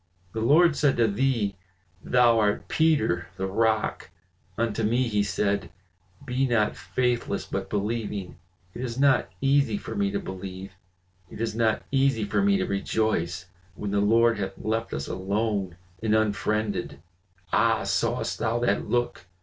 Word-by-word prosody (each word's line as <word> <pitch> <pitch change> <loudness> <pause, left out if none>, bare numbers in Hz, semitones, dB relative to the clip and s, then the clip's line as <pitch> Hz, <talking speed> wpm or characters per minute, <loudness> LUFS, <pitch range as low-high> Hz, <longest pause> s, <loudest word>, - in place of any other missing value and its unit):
The 110 - -3
Lord 155 +7 +5
said 145 -3 +2
to 115 -1 +4
thee, 110 -2 0 0.5
'Thou 120 -2 +4
art 105 -1 0
Peter, 110 - +2
the 95 - -2
rock!' 110 +2 0 0.5
unto 115 -1 -1
me 120 +4 +1
he 105 -2 +1
said, 100 -1 -1 0.6
'Be 130 +2 0
not 110 -4 +1
faithless 120 +7 -1
but - - -4
believing.' 105 -2 -3 0.4
It - - -7
is 120 -2 -4
not 135 -2 +3
easy 140 +7 +2
for - - -7
me 200 -1 0
to 200 0 -2
believe, 95 - -7 0.6
it - - -10
is 115 -1 -1
not 110 -1 +1
easy 135 -4 +2
for 105 - 0
me 200 0 +3
to - - 0
rejoice, 100 -4 -1 0.3
when 100 0 -4
the 100 - +1
Lord 115 +2 +3
hath 95 -1 -4
left 115 +1 -2
us 70 - -4
alone 100 -1 -2 0.2
and 110 -1 +2
unfriended. 105 -7 -1 0.5
Ah! 110 0 +3
sawest 115 +5 -1
thou 115 +1 0
that 120 -4 0
look? 120 -6 -1
110 Hz, 150 wpm, -26 LUFS, 100-120 Hz, 0.6 s, Lord